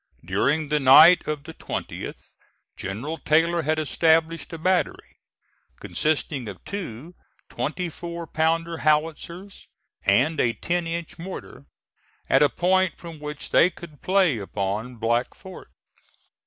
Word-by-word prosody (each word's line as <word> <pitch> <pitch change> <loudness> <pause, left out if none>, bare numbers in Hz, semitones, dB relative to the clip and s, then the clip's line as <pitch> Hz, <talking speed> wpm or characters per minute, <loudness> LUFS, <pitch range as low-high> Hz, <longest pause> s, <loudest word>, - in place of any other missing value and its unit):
During 140 - 0
the 150 0 +2
night 155 +6 +8
of 150 -2 -3
the 160 +1 -10
20th - - -6 0.6
General 120 +13 -5
Taylor 165 +2 +2
had 155 0 0
established 160 +2 +1
a 165 - -6
battery, 185 +3 -1 0.6
consisting 145 -5 -1
of 100 -3 -9
two 170 - -6 0.4
twenty 155 +9 -3
four 170 +1 -7
pounder 165 +2 0
howitzers 165 +5 -1 0.4
and 135 +10 +3
a 115 -1 +2
ten 175 +4 -2
inch 170 0 -5
mortar, 170 -5 -9 0.6
at 135 - +4
a 145 - +5
point 185 +5 +1
from 165 -3 -10
which 150 0 -7
they 180 - +5
could 165 -5 -13
play 185 - +2
upon 105 +5 -3
Black 120 +2 -1
Fort. 190 -2 -12
155 Hz, 130 wpm, -24 LUFS, 135-170 Hz, 0.6 s, night